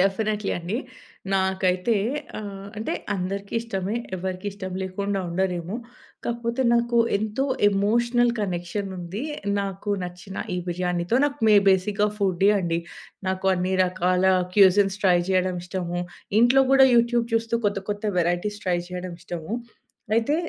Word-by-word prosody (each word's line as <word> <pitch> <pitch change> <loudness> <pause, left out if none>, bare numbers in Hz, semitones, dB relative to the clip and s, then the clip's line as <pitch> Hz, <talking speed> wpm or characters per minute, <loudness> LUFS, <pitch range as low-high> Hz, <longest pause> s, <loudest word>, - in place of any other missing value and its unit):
Definitely 210 +2 +1
అండి. 175 +6 -3 0.6
నాకైతే 190 +2 +1 0.4
ఆహ్, 200 -2 -7
అంటే 220 - -2 0.2
అందరికీష్టమే 200 +2 -3 0.2
ఎవరికీ 185 +2 -4
ఇష్టం 190 -2 -6
లేకుండా 200 +2 -2
ఉండరేమో. 180 +2 -1 0.5
కాకపోతే 235 +2 -1
నాకు 235 0 +2 0.2
ఎంతో 220 +6 -1 0.2
ఎమోషనల్ 235 +4 +2
కనెక్షన్ 185 +1 -3
ఉంది. 180 +7 -5 0.4
నాకు 195 +1 -4
నచ్చిన 180 +2 -8 0.2
ఈ - - -1
బిర్యానీతో 180 +3 0
నాకు 290 0 -1
మె 215 - +7
బేసిక్‌‌గా 200 +2 +2
ఫుడ్ది 195 -1 +2
అండి. 170 -2 0 0.5
నాకు 190 0 -2
అన్ని 185 +1 -1
రకాల 180 0 +1 0.3
క్యూజన్స్ 195 0 +5
ట్రై 180 -2 +6
చేయడం 185 -1 +1
ఇష్టము. 175 -1 -3 0.4
ఇంట్లో 250 +3 +6
గూడా 270 -1 +8
యూట్యూబ్ 235 0 +3
చూస్తూ 225 0 0
కొత్త 200 -1 0
కొత్త 205 +1 -4
వెరైటీస్ 175 +5 0
ట్రై 180 -2 +1
చేయడం 180 -1 -5
ఇష్టము. 175 +3 -5 0.6
అయితే 230 +6 +2
195 Hz, 125 wpm, -24 LUFS, 180-215 Hz, 0.6 s, గూడా